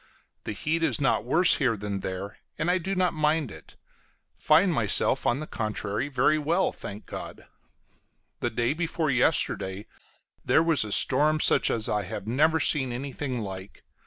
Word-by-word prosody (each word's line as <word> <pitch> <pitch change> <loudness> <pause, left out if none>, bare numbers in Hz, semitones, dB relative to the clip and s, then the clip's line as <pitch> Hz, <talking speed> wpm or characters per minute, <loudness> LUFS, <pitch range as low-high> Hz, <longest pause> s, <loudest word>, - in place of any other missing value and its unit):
The - - -3
heat 155 +10 -2
is 165 - 0
not 135 -5 +1
worse 165 +8 +4
here 125 -6 +1
than 100 -1 -4
there, 95 +2 -6 0.2
and 175 - 0
I 185 - +1
do 195 +3 -3
not 180 -1 +1
mind 155 -4 0
it; 80 - -14 0.6
find 170 +4 +3
myself, 120 +2 +1
on 120 - +1
the 155 - -5
contrary, 110 0 -3
very 145 +3 +2
well, 165 +5 +1
thank 100 +1 -9
God. - - -9 0.9
The - - -1
day 120 +4 0
before 160 -2 -1
yesterday 100 -5 0 0.6
there 160 - +3
was 165 -6 +2
a 105 - -6
storm, 150 +8 +4
such - - +2
as 110 -2 -1
I 105 - 0
have 100 +1 -7
never 155 +8 +2
seen 135 -4 +2
anything 130 0 -4
like. 95 -1 -8
135 Hz, 165 wpm, -26 LUFS, 105-155 Hz, 0.9 s, worse